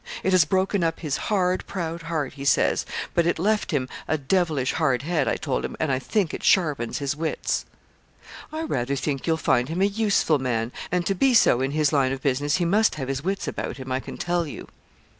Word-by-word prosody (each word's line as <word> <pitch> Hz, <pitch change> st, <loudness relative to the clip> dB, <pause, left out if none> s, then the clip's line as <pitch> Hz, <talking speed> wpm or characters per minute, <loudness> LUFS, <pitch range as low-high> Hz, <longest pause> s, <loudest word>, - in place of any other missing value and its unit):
'It 190 Hz, -, +1 dB
has 185 Hz, -4 st, +5 dB
broken 190 Hz, +3 st, +1 dB
up 165 Hz, -1 st, -1 dB
his 150 Hz, -5 st, -1 dB
hard, 185 Hz, -3 st, +1 dB
proud 170 Hz, -3 st, -4 dB
heart,' 160 Hz, -4 st, -3 dB
he 140 Hz, -1 st, -8 dB
says; 140 Hz, -, +2 dB, 0.3 s
'but 170 Hz, -1 st, +2 dB
it 175 Hz, -, +1 dB
left 210 Hz, +5 st, +1 dB
him 140 Hz, -6 st, 0 dB, 0.2 s
a 155 Hz, -, +1 dB
devilish 150 Hz, -3 st, 0 dB
hard 135 Hz, -6 st, +1 dB
head, 160 Hz, -3 st, 0 dB
I -, -, +1 dB
told 140 Hz, -5 st, -2 dB
him, -, -, -5 dB
and 155 Hz, -3 st, 0 dB
I 130 Hz, -, +1 dB
think 185 Hz, -, -1 dB
it -, -, -5 dB
sharpens 150 Hz, -, +2 dB
his 140 Hz, 0 st, -2 dB
wits.' 160 Hz, +1 st, -2 dB, 0.9 s
'I 315 Hz, +1 st, -3 dB
rather 135 Hz, -, -1 dB
think 140 Hz, +1 st, -3 dB
you'll 160 Hz, -1 st, +2 dB
find 125 Hz, -4 st, +1 dB
him 165 Hz, +3 st, -3 dB
a -, -, +6 dB
useful 200 Hz, -7 st, +2 dB
man; 120 Hz, -3 st, -1 dB, 0.2 s
and 180 Hz, -1 st, 0 dB
to 195 Hz, -, +1 dB
be 255 Hz, +6 st, +3 dB
so 130 Hz, -, +5 dB
in 135 Hz, -, 0 dB
his 150 Hz, +1 st, +1 dB
line 135 Hz, -3 st, +3 dB
of 135 Hz, 0 st, -5 dB
business 145 Hz, +2 st, +1 dB
he 175 Hz, -, 0 dB
must 210 Hz, +6 st, +3 dB
have 135 Hz, -3 st, -4 dB
his 135 Hz, +1 st, -2 dB
wits 195 Hz, +2 st, -2 dB
about -, -, -4 dB
him, 130 Hz, -1 st, -7 dB
I 130 Hz, -, +1 dB
can -, -, -8 dB
tell 175 Hz, -1 st, -1 dB
you.' -, -, -8 dB
155 Hz, 225 wpm, -24 LUFS, 135-180 Hz, 0.9 s, a